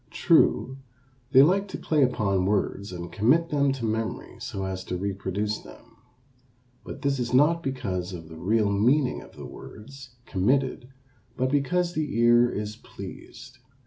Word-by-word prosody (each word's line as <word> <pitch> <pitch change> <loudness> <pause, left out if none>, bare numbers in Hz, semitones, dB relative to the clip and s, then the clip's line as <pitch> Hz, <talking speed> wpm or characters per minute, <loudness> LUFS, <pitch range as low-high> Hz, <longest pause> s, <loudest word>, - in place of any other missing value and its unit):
True, 130 +1 +2 0.5
they 135 0 +8
like 195 +6 +2
to 190 - -6
play 155 -2 0
upon 100 -7 +1
words 100 -1 -1
and 85 -1 -7
commit 145 +11 +2
them 140 -2 +2
to 130 -4 -4
memory 110 0 -3
so 95 -1 -5
as 95 -1 -4
to 90 - -3
reproduce 100 +2 -2
them. 115 0 -16 0.9
But 140 - -9
this 140 -1 +1
is 125 0 -1
not 160 +5 +4
because 100 - -3
of 85 -3 -8
the 80 - -11
real 105 +2 +1
meaning 125 +7 +2
of - - -15
the - - -9
words 130 +3 -12
committed 125 +5 0 0.5
but 130 0 0
because 175 +5 +1
the 150 -7 -2
ear 120 +1 +5
is 105 -1 -5
pleased. 130 +2 -11
120 Hz, 155 wpm, -26 LUFS, 100-140 Hz, 0.9 s, they